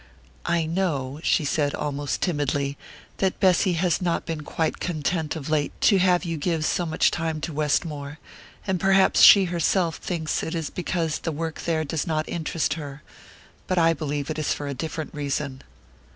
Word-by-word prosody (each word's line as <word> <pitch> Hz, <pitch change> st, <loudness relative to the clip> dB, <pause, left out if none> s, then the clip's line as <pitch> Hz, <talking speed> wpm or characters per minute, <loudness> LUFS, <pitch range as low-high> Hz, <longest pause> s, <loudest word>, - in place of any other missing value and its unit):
"I 170 Hz, -1 st, +1 dB
know," 155 Hz, -6 st, -2 dB
she 160 Hz, -, +2 dB
said, 145 Hz, 0 st, 0 dB
almost 145 Hz, -1 st, -3 dB
timidly, 145 Hz, -4 st, 0 dB, 0.4 s
"that 190 Hz, -1 st, 0 dB
Bessy 185 Hz, 0 st, +3 dB
has 175 Hz, 0 st, +1 dB
not 175 Hz, -2 st, 0 dB
been 160 Hz, -2 st, -4 dB
quite 160 Hz, +2 st, -2 dB
content 160 Hz, -1 st, -2 dB
of 150 Hz, -4 st, -6 dB
late 155 Hz, -2 st, -1 dB
to 200 Hz, -3 st, +5 dB
have 180 Hz, 0 st, +3 dB
you 165 Hz, -1 st, -2 dB
give 160 Hz, 0 st, -1 dB
so 175 Hz, +1 st, 0 dB
much 160 Hz, -, +2 dB
time 160 Hz, -2 st, -2 dB
to 160 Hz, -, -4 dB
Westmore, 150 Hz, -1 st, -1 dB, 0.5 s
and 190 Hz, -2 st, 0 dB
perhaps 195 Hz, +1 st, +4 dB
she 200 Hz, -2 st, +9 dB
herself 170 Hz, 0 st, +1 dB
thinks 160 Hz, -4 st, -2 dB
it 165 Hz, -, -4 dB
is 160 Hz, -3 st, -3 dB
because 170 Hz, -3 st, -2 dB
the 165 Hz, -, -3 dB
work 160 Hz, +1 st, -4 dB
there 160 Hz, -2 st, +1 dB
does 155 Hz, +1 st, -3 dB
not 155 Hz, -1 st, -1 dB
interest 165 Hz, -1 st, -1 dB
her; 145 Hz, -3 st, -8 dB, 0.6 s
but 185 Hz, -, 0 dB
I 165 Hz, -1 st, +5 dB
believe 145 Hz, -2 st, -3 dB
it 155 Hz, -, -4 dB
is 155 Hz, -, 0 dB
for 145 Hz, -, -5 dB
a 140 Hz, -, -3 dB
different 155 Hz, +3 st, -5 dB
reason." 140 Hz, -2 st, -3 dB
160 Hz, 180 wpm, -24 LUFS, 145-175 Hz, 0.6 s, she